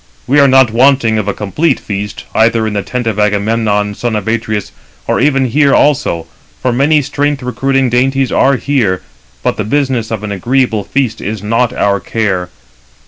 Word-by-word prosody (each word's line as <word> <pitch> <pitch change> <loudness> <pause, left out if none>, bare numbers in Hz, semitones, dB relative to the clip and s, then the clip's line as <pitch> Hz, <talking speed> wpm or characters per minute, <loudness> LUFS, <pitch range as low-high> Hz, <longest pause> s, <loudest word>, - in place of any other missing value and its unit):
We 145 +3 +3
are 140 - +6
not 130 -3 +4
wanting 120 -2 +3
of 105 - -3
a - - +1
complete 150 - 0
feast, 105 0 -5
either 115 0 +2
in 110 - -2
the 100 - -1
tent 125 +3 -4
of 110 -2 -1
Agamemnon, 105 0 0
son 115 +2 -3
of 105 -1 -3
Atreus, 110 -2 -2 0.3
or - - 0
even 135 -2 +2
here 140 +3 +3
also, 125 - +1 0.3
for 125 - 0
many 145 +4 +2
strength 145 0 -1
recruiting 135 +1 0
dainties 135 +2 +1
are 135 +1 +3
here; 120 - 0 0.4
but - - 0
the 105 - -1
business 130 -1 -1
of 110 -2 -4
an 105 - -4
agreeable 115 +2 0
feast 130 +1 -2
is 105 0 -4
not 115 +3 +1
our 100 -4 0
care. 95 -5 -2
115 Hz, 180 wpm, -13 LUFS, 105-135 Hz, 0.4 s, are